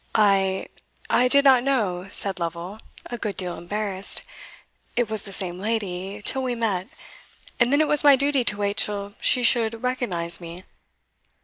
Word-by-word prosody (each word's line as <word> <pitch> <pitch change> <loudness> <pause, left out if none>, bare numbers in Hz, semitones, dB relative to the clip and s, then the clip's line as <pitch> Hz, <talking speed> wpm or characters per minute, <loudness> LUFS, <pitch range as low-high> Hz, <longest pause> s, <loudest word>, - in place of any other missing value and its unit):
"I 195 -3 +2 0.5
I 250 - +4
did 280 +2 +4
not 260 -3 +6
know," 205 -9 -1
said 195 -2 +1
Lovel, 170 +4 -5 0.3
a 240 - -7
good 210 -3 -4
deal 180 -2 -2
embarrassed, 200 +1 -3 0.7
"it 240 -3 0
was 215 -2 -1
the 195 - -9
same 180 -2 -2
lady, 200 -2 -4
till 265 - 0
we 250 -2 -2
met; 205 -5 -2 0.7
and 240 +1 +3
then 285 +2 +4
it 310 - +2
was 295 0 +1
my 285 -1 +7
duty 275 -1 +1
to 210 - +2
wait 200 0 -2
till 205 -1 -1
she 250 - +4
should 230 -1 +2
recognise 180 -10 0
me." 170 +2 -9
210 Hz, 170 wpm, -23 LUFS, 190-245 Hz, 0.7 s, my